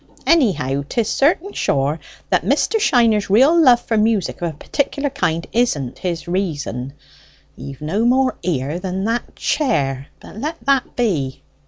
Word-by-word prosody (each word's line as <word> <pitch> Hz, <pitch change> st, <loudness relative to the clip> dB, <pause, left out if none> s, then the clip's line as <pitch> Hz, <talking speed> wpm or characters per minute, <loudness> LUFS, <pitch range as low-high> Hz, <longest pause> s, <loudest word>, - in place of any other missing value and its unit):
Anyhow 190 Hz, -, +2 dB
'tis 230 Hz, -3 st, 0 dB
certain 335 Hz, +7 st, +1 dB
sure 140 Hz, +4 st, 0 dB, 0.3 s
that -, -, +3 dB
Mr. 445 Hz, -, +1 dB
Shiner's 230 Hz, -, +3 dB
real 265 Hz, -, +5 dB
love 250 Hz, -5 st, +6 dB
for 225 Hz, -2 st, -1 dB
music 215 Hz, -5 st, 0 dB
of 170 Hz, -, -1 dB
a 150 Hz, -, -16 dB
particular 285 Hz, -, -2 dB
kind 170 Hz, -, -1 dB
isn't 155 Hz, -, 0 dB
his 170 Hz, -3 st, -4 dB
reason. 145 Hz, -, -3 dB, 0.6 s
He've 135 Hz, -1 st, -9 dB
no 170 Hz, +9 st, -1 dB
more 255 Hz, +2 st, +2 dB
ear 155 Hz, -2 st, -2 dB
than 190 Hz, 0 st, -3 dB
that 230 Hz, +3 st, -2 dB
chair. 140 Hz, -, -1 dB
But -, -, -13 dB
let 305 Hz, +8 st, -4 dB
that 275 Hz, -2 st, +1 dB
be." 155 Hz, -, -1 dB
205 Hz, 150 wpm, -19 LUFS, 150-255 Hz, 0.6 s, love